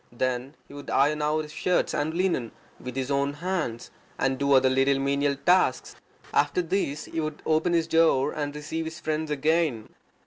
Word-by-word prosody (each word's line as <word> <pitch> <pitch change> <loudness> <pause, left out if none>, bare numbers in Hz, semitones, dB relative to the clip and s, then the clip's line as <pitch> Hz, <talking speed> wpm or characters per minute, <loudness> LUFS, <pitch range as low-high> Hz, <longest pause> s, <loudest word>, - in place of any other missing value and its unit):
Then 130 +3 -2
he - - -14
would 145 0 -9
iron 150 +2 +2
out 155 +1 +1
his 150 - -10
shirts 180 +3 0
and 155 +2 -1
linen 170 -11 0 0.3
with 125 -1 -7
his 135 +1 -2
own 140 0 +1
hands, 155 -7 -3 0.3
and 135 -1 0
do 140 0 +2
other 130 0 +5
little 135 +1 +3
menial 140 +1 +1
tasks. 175 -2 +2 0.4
After 145 +5 +2
this 160 -4 -2
he 165 - -5
would 155 -1 -5
open 160 +2 +2
his 165 -1 +2
door 160 -4 +3
and 145 -1 -4
receive 155 +2 -4
his 160 +1 -7
friends 155 -1 -2
again. 150 -5 0
150 Hz, 180 wpm, -26 LUFS, 135-160 Hz, 0.4 s, other